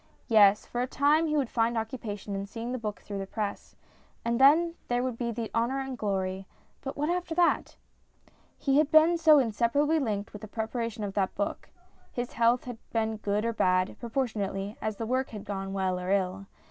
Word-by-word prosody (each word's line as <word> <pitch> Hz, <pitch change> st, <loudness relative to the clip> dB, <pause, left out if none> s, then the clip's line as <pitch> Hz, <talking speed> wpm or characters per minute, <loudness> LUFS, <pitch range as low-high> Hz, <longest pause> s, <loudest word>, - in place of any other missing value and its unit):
Yes, 210 Hz, -2 st, +5 dB
for 240 Hz, -, -3 dB
a 250 Hz, -, 0 dB
time 295 Hz, +5 st, +3 dB
he 305 Hz, 0 st, +1 dB
would 275 Hz, -4 st, +1 dB
find 230 Hz, 0 st, +1 dB
occupation 220 Hz, -3 st, -4 dB
in 195 Hz, 0 st, -3 dB
seeing 230 Hz, +3 st, -5 dB
the 255 Hz, -, -3 dB
book 210 Hz, -2 st, -5 dB
through 200 Hz, -1 st, -6 dB
the 195 Hz, -, -5 dB
press; 210 Hz, 0 st, -4 dB, 0.5 s
and 235 Hz, +2 st, +1 dB
then 325 Hz, +5 st, +6 dB
there 245 Hz, 0 st, 0 dB
would 255 Hz, -2 st, -2 dB
be 235 Hz, 0 st, -2 dB
the 230 Hz, -1 st, -4 dB
honour 240 Hz, +4 st, +1 dB
and 265 Hz, -1 st, -4 dB
glory; 190 Hz, -3 st, -2 dB, 0.3 s
but 270 Hz, -, -6 dB
what 295 Hz, +1 st, 0 dB
after 350 Hz, -2 st, -2 dB
that? 350 Hz, 0 st, +2 dB, 0.8 s
He 275 Hz, 0 st, +2 dB
had 305 Hz, -1 st, +2 dB
been 315 Hz, +2 st, +6 dB
so 320 Hz, -2 st, +6 dB
inseparably 275 Hz, +6 st, +2 dB
linked 210 Hz, -7 st, -2 dB
with 210 Hz, -, -8 dB
the 215 Hz, -, -7 dB
preparation 225 Hz, 0 st, -3 dB
of 200 Hz, -1 st, -3 dB
that 195 Hz, -2 st, 0 dB
book. 205 Hz, -, -3 dB, 0.4 s
His 245 Hz, 0 st, -4 dB
health 235 Hz, +1 st, +3 dB
had 245 Hz, -3 st, -7 dB
been 220 Hz, -1 st, 0 dB
good 210 Hz, +1 st, -1 dB
or 230 Hz, -, 0 dB
bad, 185 Hz, -3 st, +2 dB
proportionately 215 Hz, -5 st, -2 dB
as 215 Hz, -1 st, -2 dB
the 225 Hz, -, -4 dB
work 255 Hz, +3 st, 0 dB
had 210 Hz, -3 st, -8 dB
gone 195 Hz, -1 st, -4 dB
well 190 Hz, -2 st, -1 dB
or 180 Hz, 0 st, -4 dB
ill. 195 Hz, 0 st, 0 dB
230 Hz, 200 wpm, -28 LUFS, 205-260 Hz, 0.8 s, then